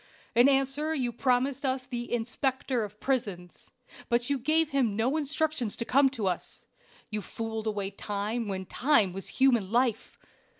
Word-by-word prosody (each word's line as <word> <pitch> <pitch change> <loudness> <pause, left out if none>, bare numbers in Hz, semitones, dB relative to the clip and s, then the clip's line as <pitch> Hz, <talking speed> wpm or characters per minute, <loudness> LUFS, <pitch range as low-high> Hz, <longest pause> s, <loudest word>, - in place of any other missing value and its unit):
"In 240 +4 +6
answer 275 +3 +1
you 250 -4 0
promised 255 +3 +1
us 260 -1 0
the 240 -1 -5
'Inspector 250 +1 0
of 210 0 -8
Prisons,' 205 -10 -3 0.4
but 240 +3 +1
you 280 - +1
gave 310 +4 +2
him 255 -8 +1
no 240 +7 +1
instructions 305 -6 0
to 230 - -3
come 270 +3 +4
to 235 -6 -4
us. 180 -2 -3 0.5
You 210 0 -2
fooled 220 +2 -5
away 200 -2 -2
time 210 +3 -3
when 190 -1 -3
time 225 -6 +2
was 195 +1 -5
human 240 -8 +2
life. 240 -2 0
240 Hz, 160 wpm, -29 LUFS, 215-270 Hz, 0.5 s, In